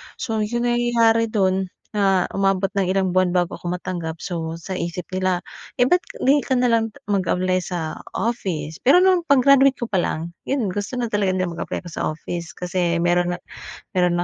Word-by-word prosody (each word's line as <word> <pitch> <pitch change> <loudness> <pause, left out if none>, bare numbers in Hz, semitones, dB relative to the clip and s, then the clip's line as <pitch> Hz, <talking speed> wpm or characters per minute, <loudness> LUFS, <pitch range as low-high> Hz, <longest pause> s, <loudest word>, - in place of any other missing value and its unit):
So 225 -4 -3
’yong 235 +3 -1
nangyayari 235 -1 +3
do’n, 190 -3 +1 0.3
ah, 195 -3 +3
umabot 195 0 +2
ng 190 -2 +1
ilang 190 -1 0
buwan 185 -1 +3
bago 175 -1 0
ako 175 - -5
matanggap, 175 -3 -4
so 165 -3 -4
sa 190 +3 -5
isip 175 0 -4
nila, 185 -1 +1 0.4
eh, 245 - +6
ba’t 355 +3 +3 0.2
’di 285 +2 +5
ka - - -10
na 250 - +3
lang 225 -1 +2 0.2
mag-apply 185 -2 +1
sa 165 -3 -4 0.2
office? 170 -10 -2
Pero 275 +7 +6
no’ng 370 -2 +4
pag-graduate 275 0 +5
ko 240 - -2
pa 200 - 0
lang, 165 +1 -3 0.2
’yon, 260 -7 +1
gusto 205 +5 -4
na 240 - 0
talaga 205 -3 +1
nila 185 - 0
mag-apply - - -4
ako - - -7
sa - - -2
office. 170 +2 -6
Kasi 175 -1 -1
meron 175 +1 +2
na - - -4 0.6
meron 180 -1 +2
190 Hz, 185 wpm, -22 LUFS, 175-230 Hz, 0.6 s, eh